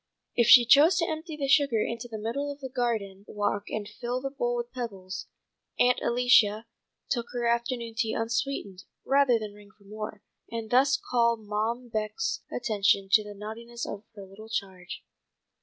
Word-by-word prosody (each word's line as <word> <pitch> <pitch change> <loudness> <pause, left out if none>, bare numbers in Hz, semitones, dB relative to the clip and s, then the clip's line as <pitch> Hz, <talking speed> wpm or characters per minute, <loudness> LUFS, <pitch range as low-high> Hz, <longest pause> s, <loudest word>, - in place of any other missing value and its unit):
If 235 -2 +3
she 245 -1 +9
chose 295 +8 +6
to 340 - +2
empty 315 0 -5
the 280 -2 -2
sugar 280 -5 +4
into 230 +2 -3
the 225 -2 -6
middle 235 +7 -3
of 285 - -9
the 265 -2 -6
garden 220 -6 -2
walk 205 0 -2
and 210 -1 -4
fill 245 +2 -4
the 270 +1 -4
bowl 245 -3 -1
with 240 0 -4
pebbles, 195 -6 -6 0.5
"Aunt 250 0 +4
Alicia" 235 -3 +4 0.5
took 235 -3 -1
her 240 -1 -2
afternoon 235 0 -1
tea 220 0 0
unsweetened, 225 -5 -3 0.2
rather 275 -3 +4
than 215 -2 -6
ring 205 0 -16
for 205 - -23
more, 215 0 -7 0.3
and 230 -2 -5
thus 265 +3 +4
call 235 -1 +1
Mom 220 +3 -3
Beck's 220 - -2
attention 200 -5 +1
to 215 0 +6
the 205 0 -9
naughtiness 230 +3 -7
of 200 +1 -6
her 200 -2 -9
little 205 +3 -13
charge. 190 -4 -5
230 Hz, 175 wpm, -28 LUFS, 210-250 Hz, 0.5 s, she